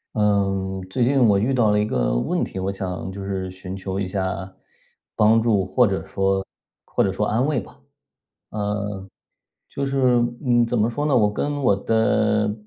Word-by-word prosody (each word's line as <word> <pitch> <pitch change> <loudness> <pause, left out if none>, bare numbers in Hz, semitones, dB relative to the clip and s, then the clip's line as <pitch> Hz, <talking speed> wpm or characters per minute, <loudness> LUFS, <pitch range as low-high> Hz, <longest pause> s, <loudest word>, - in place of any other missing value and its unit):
嗯， 95 -2 0
最 120 +6 0
近 135 +3 +3
我 100 -2 +4
遇 115 +7 +1
到 115 -4 +3
了 105 0 +3
一 105 - +1
个 - - 0
问 - - 0
题， - - -6
我 95 +1 -1
想 95 -1 -5
就 100 0 -7
是 95 -1 -4
寻 95 0 -8
求 95 0 -4
一 100 - -2
下 95 0 -3 0.6
帮 110 +2 +4
助， 110 -4 +2
或 125 +5 +3
者 100 -3 -1
说 95 0 0 0.4
或 - - 0
者 95 - +1
说 105 +2 -1
安 115 +5 +1
慰 145 -3 +1
吧。 100 - -12 0.7
嗯， 105 -2 -3 0.6
就 140 - -3
是 135 0 -2 0.5
嗯， 120 -1 +4
怎 115 0 -1
么 110 +2 +2
说 145 +5 -3
呢， 145 -3 +2
我 105 -4 +3
跟 145 +6 -2
我 125 - +4
的， 105 0 +1
105 Hz, 200 characters per minute, -22 LUFS, 95-115 Hz, 0.7 s, 我